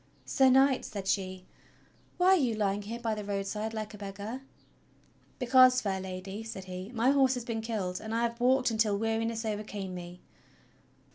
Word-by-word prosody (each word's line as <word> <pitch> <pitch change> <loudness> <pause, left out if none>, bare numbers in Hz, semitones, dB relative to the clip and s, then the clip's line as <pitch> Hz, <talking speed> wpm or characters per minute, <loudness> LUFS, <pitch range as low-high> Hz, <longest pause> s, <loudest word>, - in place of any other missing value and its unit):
"Sir 265 -1 +4
Knight," 265 0 +4
said 200 -3 -6
she, 185 -2 -1 0.7
"why 360 +1 +4
are 380 - +7
you 255 -10 +1
lying 205 -1 0
here 225 +3 -6
by 230 -2 -1
the 210 -1 -4
road 200 -1 -2
side 210 +2 -3
like 215 -1 -5
a 210 - -10
beggar.?" 205 +5 -6 1.0
"Because, 255 0 +6
fair 195 -4 -2
Lady," 190 +2 -6
said 225 -4 -7
he, 185 +1 -7
"my 245 +2 +2
horse 270 -2 +4
has 245 -2 -5
been 225 -2 -3
killed, 205 -5 -3
and 220 - -6
I 230 - +1
have 235 0 -2
walked 255 0 +3
until 215 -2 +2
weariness 225 +1 -1
overcame 205 -3 -4
me." 175 0 -8
220 Hz, 185 wpm, -30 LUFS, 195-240 Hz, 1.0 s, are